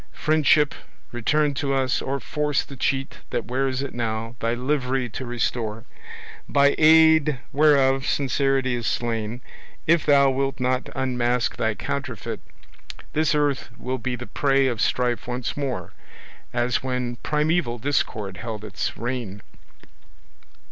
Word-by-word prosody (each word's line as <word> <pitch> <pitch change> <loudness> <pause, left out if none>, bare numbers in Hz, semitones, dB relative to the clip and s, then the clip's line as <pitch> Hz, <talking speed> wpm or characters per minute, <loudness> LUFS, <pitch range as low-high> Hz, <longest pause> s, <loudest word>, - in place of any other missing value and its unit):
Friendship, 150 -1 +3 0.4
return 145 +5 +1
to 135 0 -1
us, 130 -1 +1
or 140 +1 -2
force 150 +2 -1
the 140 - -11
cheat 135 +1 -1
That 120 - -2
wears 130 +1 -1
it 140 - -5
now, 115 0 -3
thy 115 +1 0
livery 130 -1 -1
to 125 +3 -6
restore, 115 -2 -2 0.7
By 140 0 +4
aid 160 -2 +6 0.2
whereof 135 -2 +4
sincerity 135 -2 +1
is 120 -2 -2
slain. 115 0 -2 0.4
If 165 0 +4
thou 140 -2 +6
wilt 135 +1 -1
not 130 0 0
unmask 125 -2 0
thy - - 0
counterfeit, - - -4 0.7
This 155 0 +2
earth 145 -2 0
will 130 +1 -3
be 125 +2 -2
the 125 +1 -7
prey 135 0 +2
of 120 -5 -1
strife 125 -1 0
once 125 0 -3
more, 125 -11 -3 0.6
As 120 0 0
when 125 -2 -2
primaeval 150 -2 0
discord 110 -7 -1
held 110 +2 -6
its 100 -3 -4
reign. 115 -5 -4
130 Hz, 135 wpm, -24 LUFS, 120-140 Hz, 0.7 s, aid